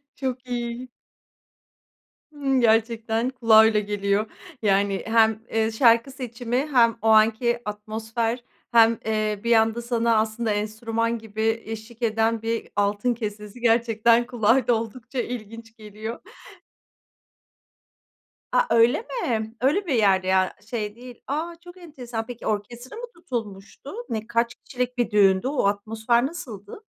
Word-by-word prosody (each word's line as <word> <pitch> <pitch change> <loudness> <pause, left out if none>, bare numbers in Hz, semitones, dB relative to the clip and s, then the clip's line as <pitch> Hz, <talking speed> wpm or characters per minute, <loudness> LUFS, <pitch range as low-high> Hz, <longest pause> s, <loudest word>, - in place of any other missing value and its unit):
Çok 255 -1 -4
iyi. 240 +1 -4 1.4
Imm, 275 -3 0
gerçekten 225 +1 +1
kulağa 230 -4 +6
öyle 215 -1 +3
geliyor. 205 +1 -1 0.4
Yani, 200 -1 +1
hem, 220 -1 +3
eee, 225 0 +1
şarkı 230 +2 +4
seçimi 245 -2 -4 0.2
hem 230 -3 +4
o 225 - +1
anki 225 +2 +4
atmosfer 220 +3 -3 0.3
hem, 230 -1 +5
eee, 215 -2 -1
bir 235 - +2
anda 225 +1 +3
sana 235 -1 +1
aslında 220 +1 0
enstrüman 225 +2 -2
gibi 225 +1 -2
eşlik 225 +2 -9
eden 225 0 +1
bir 230 0 -2
altın 205 +4 +1
kesesi 210 0 -7
gerçekten 230 0 +3
kulağa 240 +1 +2
da 240 - +5
oldukça 230 +3 -4
ilginç 230 -1 -7
geliyor. 215 +2 -7 2.3
A, - - +4
öyle 235 - +4
mi? 235 - -3
Öyle 305 - +1
bir 285 - 0
yerde 195 -5 +3
ya, 190 0 +2 0.2
şey 215 -3 -3
değil. 245 0 -12
A, 320 +5 -3
çok 350 0 -12
enteresan. 250 -10 -7
Peki 245 0 -9
orkestra 235 - -4
mı 475 - -6
tutulmuştu? 230 - -7 0.2
Ne 220 -1 -3
kaç 235 0 0
kişilik 250 0 -5
bir 240 - +1
düğündü? 195 +1 +4
O 275 -6 0
atmosfer 220 +4 +1
nasıldı? 260 - -9
230 Hz, 130 wpm, -24 LUFS, 215-245 Hz, 2.3 s, kulağa